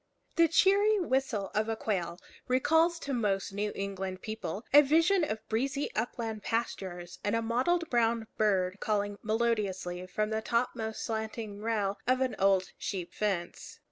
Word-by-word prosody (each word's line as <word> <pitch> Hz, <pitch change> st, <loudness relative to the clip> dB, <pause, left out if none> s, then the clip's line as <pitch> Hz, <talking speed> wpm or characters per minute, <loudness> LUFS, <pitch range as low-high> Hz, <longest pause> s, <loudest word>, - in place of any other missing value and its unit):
The 335 Hz, -1 st, +6 dB
cheery 400 Hz, +5 st, +4 dB
whistle 260 Hz, -, 0 dB
of 215 Hz, +1 st, 0 dB
a 225 Hz, -, 0 dB
quail 180 Hz, -6 st, -2 dB, 0.3 s
recalls 320 Hz, +7 st, +3 dB
to 280 Hz, -, -3 dB
most 200 Hz, -5 st, 0 dB
New 205 Hz, +1 st, -1 dB
England 195 Hz, -1 st, -4 dB
people 215 Hz, -1 st, -5 dB
a 290 Hz, -, +10 dB
vision 330 Hz, +6 st, +3 dB
of 220 Hz, -7 st, -3 dB
breezy 270 Hz, +5 st, -1 dB
upland 225 Hz, -1 st, -3 dB
pastures 185 Hz, -7 st, -3 dB
and 205 Hz, +2 st, +1 dB
a 230 Hz, -, +1 dB
mottled 290 Hz, +10 st, +1 dB
brown 230 Hz, -1 st, +2 dB
bird 190 Hz, -3 st, +1 dB
calling 205 Hz, -1 st, -1 dB
melodiously 205 Hz, -5 st, -1 dB
from 215 Hz, +4 st, -1 dB
the 220 Hz, 0 st, 0 dB
topmost 225 Hz, -1 st, -1 dB
slanting 220 Hz, -2 st, -4 dB
rail 205 Hz, -3 st, -1 dB
of 255 Hz, +1 st, +3 dB
an 260 Hz, -1 st, 0 dB
old 195 Hz, -1 st, +3 dB
sheep 180 Hz, -4 st, -4 dB
fence. 195 Hz, -5 st, -3 dB
220 Hz, 150 wpm, -30 LUFS, 195-255 Hz, 0.3 s, a